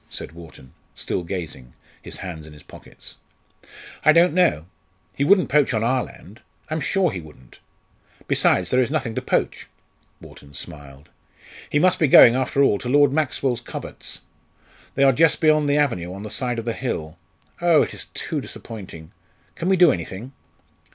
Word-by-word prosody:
said - - -7
Wharton, 80 -6 -14 0.2
still - - -3
gazing, 80 -9 -7 0.3
his - - -7
hands 80 -4 -8
in 75 - -13
his 75 - -15
pockets. - - -14 0.9
"I 155 - +6
don't 170 +1 +4
know; 170 - +2 0.5
he 140 - -1
wouldn't 185 +4 +4
poach 145 -5 +3
on 110 - 0
our 125 +2 +1
land; 105 +5 -14 0.3
I'm 155 - -1
sure 185 +5 +1
he 95 -5 -6
wouldn't! 75 -5 -17 0.7
Besides, 90 -1 +2
there 130 - +3
is 125 - 0
nothing 135 -7 -2
to - - -3
poach." - - -2 0.5
Wharton 70 0 -15
smiled. 70 +3 -10 0.6
"He - - 0
must 180 +4 +3
be 155 - +3
going, 120 -3 +8
after 130 +2 +1
all, 105 -7 +2
to 120 - -5
Lord 145 0 +4
Maxwell's 135 -5 -1
coverts! - - -8 0.7
They 140 - +2
are 135 -1 +5
just 160 +4 +3
beyond 155 -2 +3
the 145 - +2
avenue, 90 -13 0
on 100 +2 -8
the 105 - -7
side 125 -2 -2
of 115 - -5
the 115 - -1
hill. 80 -12 -5 0.4
Oh! 170 -3 +4
it - - -6
is - - -8
too - - -3
disappointing! 95 -8 -9 0.4
Can 175 - -3
we 190 - +3
do 175 -3 +6
anything?" 95 +6 -6
120 Hz, 175 wpm, -22 LUFS, -, 0.9 s, going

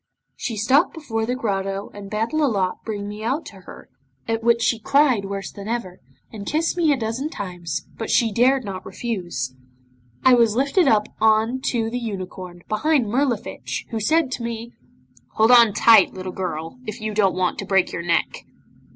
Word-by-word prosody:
She 230 -4 -4
stopped 270 - +3
before 225 -8 -3
the 250 - 0
grotto 195 -4 -3
and 205 -1 -9
bade 220 +4 -2
Lolotte 225 -12 0
bring 205 -2 -4
me 210 +1 -7
out 270 +8 -1
to 200 - -11
her, 185 - -13 0.4
at 225 0 -1
which 235 0 +3
she 225 0 +1
cried 260 -3 +3
worse 195 0 -5
than 200 0 -9
ever, 220 -6 -4 0.3
and 205 -2 -8
kissed 325 +3 0
me 335 -4 +3
a 280 - +2
dozen 240 +5 -3
times, 180 - -5
but 225 - -4
she 230 -2 +3
dared 255 +4 +3
not 190 -2 -6
refuse. 175 - -4 0.7
I 260 - +7
was 230 -3 +4
lifted 280 +8 +2
up 210 -1 +3
on 220 +3 +3
to 225 -2 0
the 245 - -2
unicorn, 185 -5 -7
behind 270 +4 +1
Mirlifiche, 245 -2 -2
who 225 - -2
said 310 +5 +2
to 245 - -4
me 235 0 -5 0.6
'"Hold 220 +2 +4
on 235 -3 +7
tight, 215 0 +5
little 185 0 -5
girl, 165 +2 -5
if 215 - -5
you 215 0 -4
don't 200 -3 +2
want 185 -1 -1
to 195 - -4
break 190 -2 +2
your - - -4
neck." 170 0 -1
220 Hz, 185 wpm, -22 LUFS, 195-245 Hz, 0.7 s, I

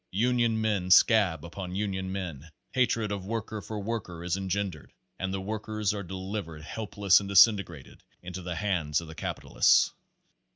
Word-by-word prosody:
Union 115 +2 +1
men 105 -4 0
scab 90 -5 +5
upon 90 +1 -6
union 95 -2 -2
men; 85 -6 -5 0.2
hatred 115 -5 +1
of 100 -2 -3
worker 110 -1 -4
for 110 0 -6
worker 100 -6 -4
is 90 0 0
engendered, 95 -5 -3 0.3
and 95 0 -2
the 95 - -2
workers 110 +1 -2
are 100 - -4
delivered 95 -4 -6
helpless 100 0 +2
and 100 -1 -6
disintegrated 100 - +3 0.2
into 90 +1 -6
the 90 -1 -4
hands 85 -7 0
of 85 - -9
the 80 - -9
capi - - -5
talists. - - +4
95 Hz, 160 wpm, -28 LUFS, 90-105 Hz, 0.3 s, scab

